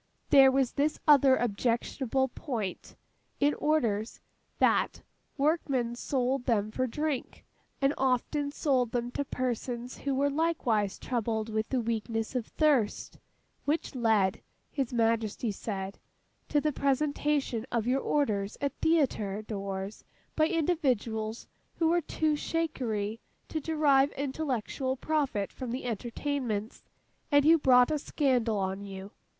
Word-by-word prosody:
There 270 -1 +8
was 265 -2 +2
this 295 +2 0
other 275 -3 +7
objectionable 245 +3 0
point, 230 - -5 0.4
in 290 +1 +3
orders, 235 -8 0 0.4
that - - +2 0.3
workmen 275 -5 +1
sold 255 0 -1
them 215 -4 +1
for 255 +3 -1
drink, 295 +1 -3 0.3
and 275 +1 +2
often 270 +3 0
sold 260 -5 +1
them 240 0 -1
to 285 - -2
persons 250 -1 -3
who 275 -1 -1
were 280 +1 +2
likewise 260 -10 0
troubled 225 -3 -2
with 220 0 -2
the 260 - +1
weakness 225 0 -2
of 250 -4 -2
thirst: 285 -9 +1 0.5
which 300 +2 -1
led 220 -6 +2 0.3
(His 275 -4 -2
Majesty 230 -1 0
said) 195 -1 -5 0.5
to 295 - +3
the 300 0 0
presentation 280 -3 0
of 235 -2 0
your 260 +2 +1
orders 210 -9 0
at 280 -1 -1
Theatre 220 -11 +1
doors, 195 -1 -5 0.3
by 310 0 +3
individuals 255 - -1 0.3
who 325 -1 +2
were 345 +1 +3
'too 310 0 0
shakery' 235 -10 -2 0.3
to 315 - -3
derive 290 -3 +3
intellectual 265 -2 -2
profit 275 -9 -1
from 255 -2 -6
the 250 +2 -4
entertainments, 235 -1 -3 0.5
and 285 0 +5
who 325 +1 +6
brought 250 -1 +5
a 305 - +1
scandal 250 -7 +1
on 190 0 -2
you. 195 0 -8
255 Hz, 130 wpm, -29 LUFS, 220-285 Hz, 0.5 s, There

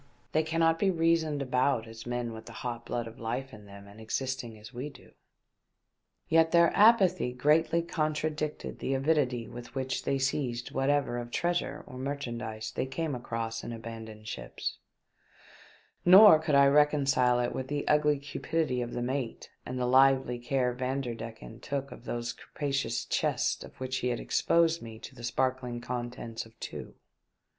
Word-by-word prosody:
" - - -36
They 155 - +4
cannot 165 +1 +2
be 200 - +3
reasoned 165 -4 +2
about 125 -2 +1
as 115 +1 -10
men 120 -1 -2
with 110 0 -10
the - - -9
hot 120 -1 -4
blood 120 -1 -2
of 115 0 -10
life 125 +4 -3
in 105 -1 -12
them 100 0 -12
and 100 +2 -13
existing 120 0 -3
as 105 +1 -12
we 130 +5 -5
do." 135 - -17 1.2
Yet 165 0 +4
their 170 0 +4
apathy 195 - +5
greatly 155 +6 +3
contradicted 155 -1 -2
the 135 - -1
avidity 135 -4 +1
with 120 +1 -10
which 130 -1 -2
they 140 - +1
seized 130 -3 -1
whatever 135 -2 +1
of 120 0 -6
treasure 175 +7 -1
or 130 - -9
merchandise 120 -5 -4
they - - -2
came 160 +2 -2
across 115 -2 -4
in 120 - -5
abandoned 110 -2 -8
ships, 65 -6 -5 1.2
nor 185 -2 +9
could 155 -2 +1
I 140 0 +7
reconcile 140 -4 +4
it 120 0 0
with 130 - -4
the 145 0 -3
ugly 150 -1 +4
cupidity 145 -1 -2
of 120 -1 -4
the 120 - -2
mate 130 -1 -3 0.2
and 130 - -4
the 125 - 0
lively 130 -1 +4
care 125 0 0
Vanderdecken 120 -4 -4
took 140 0 -4
of - - -11
those 120 0 -3
capa 145 -2 -5
cious 135 0 -1
chests - - 0
of - - -14
which 130 0 -2
he 125 - -1
had 120 -1 -1
exposed 165 0 +2
to - - -12
me 115 -1 -8 0.2
the 120 -2 -12
sparkling 125 0 -1
contents 120 -1 -5
of 115 - -24
two. - - -7
130 Hz, 170 wpm, -30 LUFS, 120-150 Hz, 1.2 s, nor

